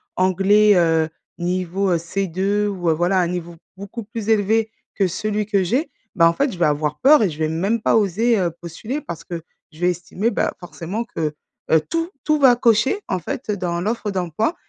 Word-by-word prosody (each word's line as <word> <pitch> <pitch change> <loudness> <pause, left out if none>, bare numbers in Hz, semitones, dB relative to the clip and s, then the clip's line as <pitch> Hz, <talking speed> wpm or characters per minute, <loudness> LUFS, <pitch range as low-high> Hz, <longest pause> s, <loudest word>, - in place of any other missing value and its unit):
anglais, 195 +3 +4
heu, 165 -2 +3 0.3
niveau, 185 +2 -1
heu, 170 - +3
C2 195 +4 -1
ou 180 -4 -1
heu, - - +4
voilà 175 +4 +1
un 175 - +2
niveau 175 -1 -5 0.2
beaucoup 200 +4 -7
plus 225 0 -6
élevé 220 +1 +2 0.2
que 195 -2 +2
celui 210 +4 -2
que 200 -3 +1
j'ai. 255 - -1 0.2
Bah, 165 -3 +6
en - - 0
fait, 280 +3 0
je - - -8
vais - - +4
avoir 150 0 0
peur 290 -1 +6
et 190 - +2
je 150 - -8
vais 155 0 0
même 195 +8 0
pas - - +2
oser, 220 +2 +2
heu, 175 -2 0
postuler 215 - -5
parce 170 - -7
que 170 -2 -6 0.3
je 155 - -17
vais 180 0 +2
estimer, 185 +6 -2
bah, - - 0
forcément 180 +5 -5
que, 155 -8 -3 0.4
heu, 160 -1 +5
tout 330 +1 -1
tout 305 -1 +2
va 255 -3 +6
cocher 235 - +2
en 185 - -1
fait, 215 - -6
heu, 205 - 0
dans 170 -2 -2
l'offre 215 +1 -2
d'emploi, 185 - -1
195 Hz, 210 wpm, -21 LUFS, 170-220 Hz, 0.4 s, Bah